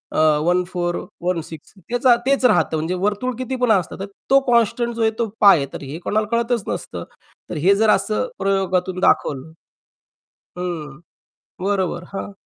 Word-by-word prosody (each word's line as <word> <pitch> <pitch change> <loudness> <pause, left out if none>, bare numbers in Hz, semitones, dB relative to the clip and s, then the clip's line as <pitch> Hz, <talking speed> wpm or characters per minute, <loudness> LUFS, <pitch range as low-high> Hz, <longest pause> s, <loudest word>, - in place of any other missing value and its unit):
अ, - - +2 0.3
1416 175 -2 -2 0.2
त्याचं 245 0 +4
तेच 275 -1 +2
राहतं. 210 -8 +3
म्हणजे 160 +4 -2
वर्तुळ 210 +6 -1
कितीपण 255 -2 0
असतं, 190 -2 0
तर 195 - -3 0.2
तो 275 0 +6
कॉन्स्टंट 235 +1 +2
जो 230 - -3
आहे 220 0 +3
तो 230 - +1
π 200 -4 +8
आहे. 140 - -1
तर - - -6
हे 140 +4 -6
कोणाला 215 0 0
कळतच 235 -2 0
नसतं. - - -5 0.5
तर - - -4
हे 200 +1 +6
जर 220 +1 +3
असं 210 - +1
प्रयोगातून 185 -2 0
दाखवलं 140 -5 +1 1.1
हं. 155 -6 -5 0.7
बरोबर 195 -3 -1
हां. 200 - -5
195 Hz, 150 wpm, -21 LUFS, 175-235 Hz, 1.1 s, π